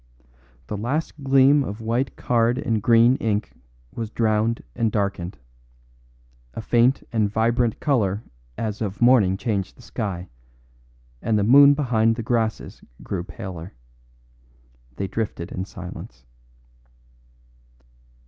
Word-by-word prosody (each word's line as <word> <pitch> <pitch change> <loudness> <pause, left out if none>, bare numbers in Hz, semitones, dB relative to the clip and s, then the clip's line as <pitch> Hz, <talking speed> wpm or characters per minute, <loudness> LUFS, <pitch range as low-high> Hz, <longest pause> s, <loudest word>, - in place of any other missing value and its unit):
The 105 - -5
last 140 +6 -3
gleam 135 +1 +5
of 105 -2 -6
white 120 +4 -1
card 120 0 +1
and 115 -5 -1
green 120 +4 +5
ink 105 -2 -1 0.4
was 115 -2 -4
drowned 110 +1 0
and 115 -3 0
darkened; 100 -4 -2 1.2
a - - -4
faint 120 +4 +3
and 110 -3 +2
vibrant 115 +2 +1
colour 110 -8 0 0.3
as 110 -1 -3
of 100 -2 -3
morning 120 -7 +4
changed 100 -4 -3
the 125 - -16
sky, 95 -8 -4 0.9
and 110 -1 +1
the 105 - +1
moon 140 +5 +7
behind 115 -5 +2
the 115 - -5
grasses 115 -1 -2 0.2
grew 90 -3 -3
paler. 90 -5 -8 1.2
They 95 - -3
drifted 100 -5 -4
in 95 - -4
silence. 90 -10 -10
110 Hz, 120 wpm, -23 LUFS, 100-120 Hz, 1.2 s, moon